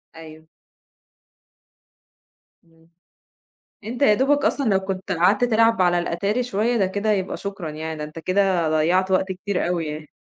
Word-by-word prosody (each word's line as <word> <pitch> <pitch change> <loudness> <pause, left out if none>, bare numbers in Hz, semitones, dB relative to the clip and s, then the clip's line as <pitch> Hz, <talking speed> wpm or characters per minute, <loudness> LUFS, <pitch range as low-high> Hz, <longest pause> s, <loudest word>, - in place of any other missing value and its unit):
أيوه. 160 -1 -12 2.2
إمم، 165 0 -27 0.9
أنت 240 +5 -6
يادوبك 280 +4 +3
أصلًا 275 -7 +1
لو 195 -2 +3
كنت 190 0 -5
قعدت 180 +6 +2
تلعب 225 -2 +3
على 175 -1 +3
الأتاري 200 +8 -1
شوية، 235 +1 0
ده 200 - +2
كده 205 +3 -1
يبقى 190 -2 -1
شكرًا 195 -5 -6
يعني، 160 +1 -6
ده 150 - -5
أنت 150 +2 -8
كده 185 -2 +1
ضيّعت 175 +5 +1
وقت 190 0 +1
كتير 190 0 -3
أوي 175 -2 -1
يعني. 150 0 -7
190 Hz, 145 wpm, -22 LUFS, 165-210 Hz, 2.2 s, يادوبك